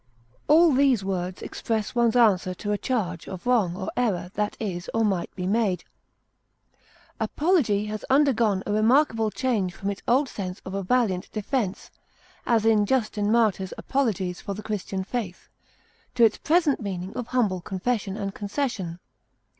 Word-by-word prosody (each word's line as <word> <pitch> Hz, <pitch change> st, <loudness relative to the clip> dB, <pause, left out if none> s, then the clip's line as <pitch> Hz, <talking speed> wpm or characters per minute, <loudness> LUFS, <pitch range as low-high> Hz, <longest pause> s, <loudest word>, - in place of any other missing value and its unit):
All 320 Hz, +1 st, +6 dB
these 260 Hz, -6 st, +3 dB
words 185 Hz, -1 st, -3 dB
express 220 Hz, -2 st, -3 dB
one's 235 Hz, -2 st, +2 dB
answer 195 Hz, -6 st, +3 dB
to 205 Hz, +2 st, -4 dB
a 205 Hz, -, +1 dB
charge 190 Hz, -9 st, -2 dB
of 185 Hz, +2 st, -8 dB
wrong 220 Hz, -9 st, +2 dB
or 190 Hz, -, -4 dB
error 205 Hz, -7 st, -1 dB
that 210 Hz, -1 st, -2 dB
is 185 Hz, -5 st, -4 dB
or 225 Hz, 0 st, +3 dB
might 190 Hz, -4 st, 0 dB
be 180 Hz, -, -4 dB
made. 200 Hz, -2 st, +1 dB, 1.4 s
Apology 290 Hz, -, +1 dB
has 215 Hz, 0 st, -5 dB
undergone 235 Hz, -8 st, +3 dB
a -, -, -2 dB
remarkable 225 Hz, +1 st, +3 dB
change 210 Hz, -7 st, -1 dB
from 200 Hz, 0 st, -3 dB
its 200 Hz, -, -7 dB
old 265 Hz, +4 st, +3 dB
sense 185 Hz, -6 st, -5 dB
of 190 Hz, -, -6 dB
a 195 Hz, -, -2 dB
valiant 195 Hz, -3 st, 0 dB
defense 215 Hz, -2 st, -2 dB, 0.6 s
as 225 Hz, -2 st, +3 dB
in 215 Hz, -2 st, +4 dB
Justin 215 Hz, -4 st, 0 dB
Martyr's 210 Hz, -5 st, +1 dB
Apologies 195 Hz, -9 st, -1 dB
for 200 Hz, -, -5 dB
the 210 Hz, -, -8 dB
Christian 195 Hz, -2 st, -3 dB
faith 195 Hz, -3 st, -5 dB, 0.7 s
to 235 Hz, -, +4 dB
its 220 Hz, -, +1 dB
present 320 Hz, -3 st, +2 dB
meaning 190 Hz, -2 st, -5 dB
of 245 Hz, -, -4 dB
humble 215 Hz, -9 st, 0 dB
confession 200 Hz, +1 st, -2 dB
and 200 Hz, -2 st, -3 dB
concession. 205 Hz, -, -3 dB
210 Hz, 155 wpm, -25 LUFS, 190-245 Hz, 1.4 s, All